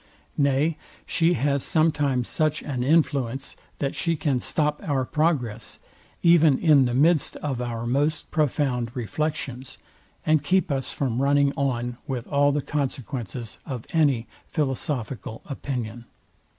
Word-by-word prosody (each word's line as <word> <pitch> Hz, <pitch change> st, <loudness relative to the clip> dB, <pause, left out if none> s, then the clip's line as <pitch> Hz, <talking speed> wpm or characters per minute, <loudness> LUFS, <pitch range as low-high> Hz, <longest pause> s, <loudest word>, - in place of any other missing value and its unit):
Nay 140 Hz, +3 st, +2 dB, 0.3 s
she 165 Hz, +1 st, +2 dB
has 140 Hz, 0 st, +1 dB
sometimes 145 Hz, -6 st, +1 dB
such 155 Hz, -1 st, 0 dB
an 130 Hz, -4 st, -2 dB
influence, 140 Hz, -3 st, +1 dB, 0.2 s
that 140 Hz, -1 st, -1 dB
she 165 Hz, -1 st, 0 dB
can 145 Hz, -4 st, 0 dB
stop 150 Hz, +4 st, 0 dB
our 135 Hz, -4 st, 0 dB
progress, 130 Hz, -8 st, -1 dB, 0.5 s
even 165 Hz, -5 st, +6 dB
in 150 Hz, -5 st, +5 dB
the 120 Hz, -1 st, -1 dB
midst 155 Hz, +3 st, +3 dB
of 135 Hz, -4 st, -3 dB
our 120 Hz, -1 st, -3 dB
most 145 Hz, +5 st, 0 dB
profound 135 Hz, -5 st, 0 dB
reflections, 130 Hz, +1 st, -3 dB, 0.5 s
and 155 Hz, -2 st, +3 dB
keep 185 Hz, 0 st, +2 dB
us 135 Hz, -1 st, -1 dB
from 130 Hz, -3 st, -1 dB
running 140 Hz, 0 st, +3 dB
on 125 Hz, -4 st, -1 dB
with 125 Hz, -3 st, -3 dB
all 145 Hz, -1 st, +3 dB
the 145 Hz, 0 st, -1 dB
consequences 130 Hz, -5 st, -4 dB
of 125 Hz, -6 st, -6 dB
any 140 Hz, -8 st, +3 dB, 0.2 s
philosophical 135 Hz, -6 st, -3 dB
opinion. 120 Hz, -5 st, -5 dB
140 Hz, 130 wpm, -25 LUFS, 125-150 Hz, 0.5 s, even